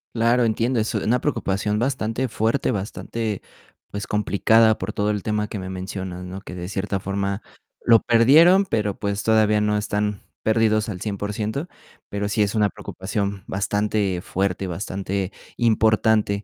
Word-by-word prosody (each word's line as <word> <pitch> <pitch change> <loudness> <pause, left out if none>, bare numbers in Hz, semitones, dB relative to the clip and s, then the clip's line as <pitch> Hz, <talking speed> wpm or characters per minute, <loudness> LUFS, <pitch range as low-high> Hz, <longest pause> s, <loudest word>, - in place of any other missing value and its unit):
Claro, 120 +2 +3
entiendo. 115 +2 +1
Es 110 +1 -1
una 115 +4 +1
preocupación 105 -7 -1
bastante 125 0 -1
fuerte, 115 +5 0
bastante, 105 +1 -4 0.5
pues, 100 0 -5
complicada, 110 +2 +3
por 95 +3 -3
todo 105 0 0
el 105 -2 -2
tema 105 0 -1
que 105 - -5
me 95 - -6
mencionas, 95 -1 -5
¿no? 95 +2 -7
Que 90 - -9
de 90 0 -5
cierta 100 0 -2
forma, 100 +1 -2 0.4
lo 115 -1 +7
perdieron. 160 +12 +6
Pero 105 - -1
pues, 100 0 -2
todavía 110 -1 +3
no 105 0 +1
están 105 -1 -1 0.2
perdidos 110 -1 +2
al 90 -4 -5
100%, 105 - -3 0.4
pero 100 0 -3
sí 105 - +1
es 105 +1 +1
una 105 -1 +3
preocupación, 100 +1 -4
bastante 100 -1 -1
fuerte, 95 0 -1
y - - -3
bastante 95 +2 -3 0.3
importante, 110 -2 +2
105 Hz, 155 wpm, -23 LUFS, 100-110 Hz, 0.5 s, lo